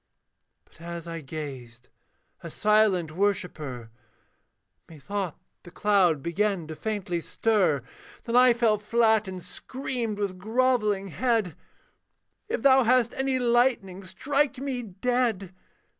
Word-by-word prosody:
But - - -22
as 170 0 -7
I 165 -1 -5
gazed, 130 -5 -8 0.5
a - - -7
silent 210 -6 +2
worshipper, 155 - -2 1.0
Methought 170 +4 -5 0.2
the - - -13
cloud 180 -7 +2
began 190 0 0
to 155 0 -7
faintly 190 -4 -3
stir; 185 - +1 0.4
Then 235 - -3
I 250 0 +7
fell 230 -3 +2
flat, 220 0 +2
and 185 -1 -6
screamed 250 -5 -4
with 195 -3 -3
grovelling 215 -2 +1
head, 225 -4 0 0.9
'If 470 - -2
thou 265 -1 +6
hast 240 0 +3
any 265 0 0
lightning, 240 -6 +1
strike 280 +8 0
me 265 -1 -3
dead! 220 -2 -1
205 Hz, 115 wpm, -26 LUFS, 170-240 Hz, 1.0 s, I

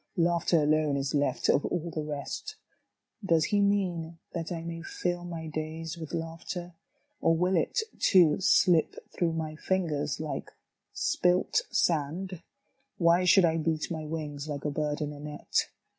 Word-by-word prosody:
Laughter 170 -1 +3
alone 150 -1 +2
Is 135 -1 -2
left 140 -3 +1
of 140 - +4
all 170 0 -2
the 155 - -3
rest. 150 - -5 0.7
Does 165 -4 +3
He 205 +1 +2
mean 180 -5 0 0.2
that 165 -1 -4
I 165 -2 -3
may 165 0 -5
fill 175 +1 -3
my 170 -2 -6
days 155 +1 -4
with 160 -3 -8
laughter, 170 +1 -5 0.5
Or 165 - +4
will 180 +2 +2
it, 310 - +1 0.2
too, 175 -6 +5
slip 175 -3 +4 0.2
through 170 -2 0
my 160 -1 -3
fingers 155 -5 -1
like 155 -2 -4 0.4
spilt 180 +1 +1
sand? 170 +3 0 0.6
Why 170 +1 +4
should 185 +1 +6
I 165 -1 +2
beat 160 +1 -1
my 160 -2 -3
wings 150 -2 -5
like 145 -1 -5
a 150 - 0
bird 150 +1 -2
in 150 0 -2
a 145 - -10
net. 150 0 -1
165 Hz, 160 wpm, -29 LUFS, 150-175 Hz, 0.7 s, should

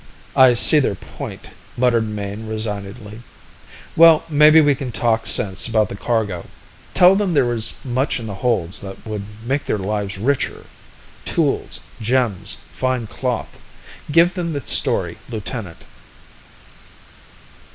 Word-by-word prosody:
"I 130 -2 +6
see 150 +6 +6
their 125 -8 0
point," - - -9 0.3
muttered 120 -2 +2
Mayne 105 +1 -6
resignedly. 105 0 -5 0.7
"Well, 165 -1 +7
maybe 150 +1 +6
we 145 -2 +4
can 130 -2 -5
talk 115 +1 0
sense 95 +2 +2
about 110 -3 +1
the - - -6
cargo. 100 -5 -2 0.5
Tell 180 +1 +6
them 195 -3 0
that - - +5
there 120 -1 0
is 110 -2 -2
much 130 0 -1
in 115 - -7
the 105 - -5
holds 100 -4 -1
that 95 -1 -10
would 105 -2 -5 0.2
make 135 +3 -1
their - - 0
lives 100 0 -3
richer. 130 +7 -1 0.6
Tools, - - -1 0.2
gems, 115 -4 0
fine 130 -2 -2
cloth 125 +2 -4 0.5
give 170 +4 +4
them 170 -3 -3
the 140 -4 -5
story, - - 0
lieutenant." 110 -5 -6
115 Hz, 135 wpm, -20 LUFS, 105-135 Hz, 0.7 s, Well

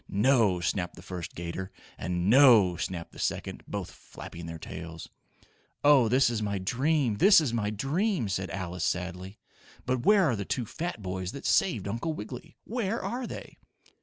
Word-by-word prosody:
"No!" 105 -3 +3
snapped 90 +2 -1
the - - -13
first 90 -3 -7
'gator. 85 +3 -5 0.2
And 90 +1 -2
"No!" 115 -7 +7
snapped 85 -1 -4
the - - -13
second, - - -3
both - - -5
flapping 85 0 -10
their 85 0 -6
tails. 80 0 -8 0.7
"Oh, 145 -5 +6
this 130 0 +4
is 110 -2 -2
my 100 -1 -1
dream! 130 +4 +1
This 200 - +7
is 140 -7 -1
my 105 -3 0
dream!" 145 - 0
said 95 -1 -2
Alice, 90 -1 -4
sadly. 90 +2 -3 0.5
"But 125 -1 -1
where 205 +2 +5
are 130 -7 +2
the 100 - -3
two 120 +4 -2
fat 165 - -5
boys 95 0 -4
that 140 - -8
saved 110 - +2
Uncle 115 +10 -2
Wiggily. 160 +7 -8
Where 230 -1 -2
are 245 0 -3
they?" - - -9
105 Hz, 170 wpm, -28 LUFS, 90-140 Hz, 0.7 s, No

